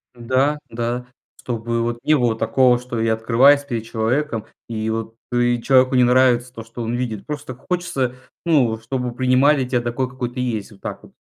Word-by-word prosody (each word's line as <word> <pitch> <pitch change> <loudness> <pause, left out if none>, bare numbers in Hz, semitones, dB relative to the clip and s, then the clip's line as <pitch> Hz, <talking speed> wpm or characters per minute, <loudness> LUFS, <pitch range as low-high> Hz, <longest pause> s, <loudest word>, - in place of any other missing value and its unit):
Да 130 +5 +1
да. 120 +1 -3 0.3
Чтобы 115 -1 -2
вот 120 0 -2
не 155 +1 +4
было 120 -3 +1
такого, 125 +2 +3
что 125 -2 -5
я 115 0 +2
открываюсь 125 +6 +4
перед 120 -6 -4
человеком, 115 +2 -1 0.2
и 110 -1 -3
вот 115 0 -3 0.2
и 120 -1 +1
человеку 130 0 +4
не 125 - +5
нравится 125 0 +3
то, 115 - -8
что 115 +1 -9
он 115 +1 -2
видит. 115 -5 -3
Просто 145 -4 -6
хочется, 155 -6 -2 0.3
ну, 130 -9 +3
чтобы 125 +1 -3
принимали 130 +3 +3
тебя 125 -2 0
такой, 120 +2 -2
какой 125 -1 -4
ты 125 - -6
есть. 110 -4 -3
Вот 100 - -17
так - - -6
вот. - - -17
125 Hz, 185 wpm, -21 LUFS, 115-130 Hz, 0.3 s, не